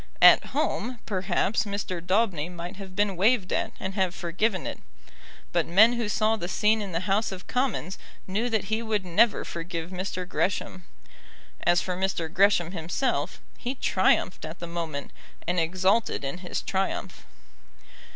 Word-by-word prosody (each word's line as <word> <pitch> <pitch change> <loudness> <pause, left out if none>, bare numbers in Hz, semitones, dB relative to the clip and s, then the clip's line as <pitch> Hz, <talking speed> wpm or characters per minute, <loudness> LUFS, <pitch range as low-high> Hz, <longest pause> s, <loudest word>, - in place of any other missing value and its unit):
"At - - +8
home," 250 0 -1
perhaps, 190 +1 0
Mr. 200 -4 -3
Daubeny 185 -4 +1
might 175 +2 -7
have 190 -2 -9
been 205 -2 +1
waved 200 +1 +2
at, - - 0
and 190 +1 -4
have 190 -2 0
forgiven 185 +3 -1
it; - - -5 0.7
but 170 -2 +1
men 215 +7 +6
who 235 -3 -2
saw 215 +1 +2
the 175 -6 -4
scene 215 +4 +2
in 200 -2 -5
the 165 0 -1
House 200 +3 +1
of 185 -1 -8
Commons 250 - -1 0.3
knew 215 +6 -1
that 220 -3 +1
he 220 +3 -1
would 215 -4 -1
never 210 +6 +3
forgive 170 0 -5
Mr. 185 -1 -4
Gresham. 185 -1 -2 0.8
As 175 0 +5
for 180 - -2
Mr. 180 -3 -2
Gresham 190 -3 +4
himself, 175 - -1 0.2
he 250 +3 -3
triumphed 190 -5 +2
at 155 +2 -6
the 170 - -6
moment, 165 -4 -4 0.3
and 175 +1 +1
exulted 185 +4 +1
in 140 +6 -4
his 180 -1 -4
triumph. 190 0 -2
190 Hz, 160 wpm, -27 LUFS, 175-210 Hz, 0.8 s, At